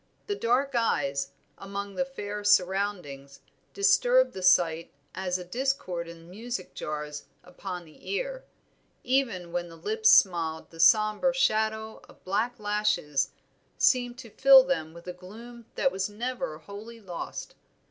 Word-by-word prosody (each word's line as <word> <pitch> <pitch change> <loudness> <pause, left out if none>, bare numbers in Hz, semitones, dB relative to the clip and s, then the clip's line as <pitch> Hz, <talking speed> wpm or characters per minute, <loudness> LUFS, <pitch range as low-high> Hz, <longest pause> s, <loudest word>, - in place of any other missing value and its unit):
The 410 - -2
dark 265 0 +1
eyes, 140 - 0 0.3
among 200 0 -6
their 270 - 0
fair 210 -6 -6
surroundings, 180 -9 0 0.4
disturbed - - +4
the 190 - -7
sight 170 -3 +3 0.2
as 185 -1 -2
a 180 - -7
discord 185 -6 -2
in 165 0 -12
music 215 +1 -6
jars 150 -1 -5 0.2
upon 180 0 -7
the 155 - -14
ear; - - -3 0.6
even 230 -10 0
when 175 0 -3
the 165 - -12
lips 440 - +1
smiled 165 - +3
the 165 - -14
sombre 215 +8 +4
shadow 220 -3 0
of - - -19
black 220 +6 -1
lashes 205 -9 0 0.5
seemed 245 -2 +2
to 240 -4 -11
fill 270 +2 +8
them 165 -12 -2
with 170 - -12
a 180 - -5
gloom 225 +6 -12
that 270 - +2
was 190 +1 -2
never 230 -6 -4
wholly 205 +7 -10
lost. 180 -5 -7
205 Hz, 140 wpm, -27 LUFS, 175-245 Hz, 0.6 s, fill